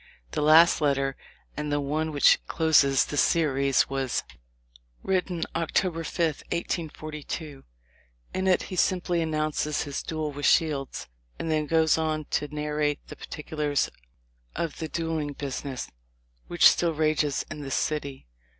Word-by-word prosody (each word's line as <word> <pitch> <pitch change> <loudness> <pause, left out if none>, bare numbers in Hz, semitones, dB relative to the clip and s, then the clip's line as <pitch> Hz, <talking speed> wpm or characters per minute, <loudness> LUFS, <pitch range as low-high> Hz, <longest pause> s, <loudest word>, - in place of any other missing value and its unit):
The - - -2
last 160 +3 +6
letter, 135 -2 +1 0.4
and 150 0 -3
the 145 - +1
one 155 +3 -1
which 145 -2 +4
closes 145 -4 +4
this 145 - +1
series, 140 -5 +2
was 135 -2 -1 0.8
written 180 -3 -1
October 165 +1 0
5, 160 -1 -1
1842. 155 -3 -4 0.7
In 190 0 -1
it 185 - +3
he 185 - -6
simply 180 -1 +1
announces 155 -1 -1
his 140 -1 -4
"duel 155 -2 -3
with 145 0 -1
Shields," 140 - +1 0.3
and 165 - -3
then 155 -1 0
goes 160 0 +3
on 155 -1 -1
to 150 - 0
"narrate 150 0 -2
the - - -8
particulars 150 -2 -2 0.6
of 165 -3 -3
the 160 - -3
duelling 160 -3 -2
busi 140 0 -5
ness, 130 -3 -5 0.6
which - - +6
still 170 -2 +2
rages 155 -2 +1
in 155 -1 -6
this 135 -2 -3
city." 140 - -2
155 Hz, 140 wpm, -27 LUFS, 145-160 Hz, 0.8 s, last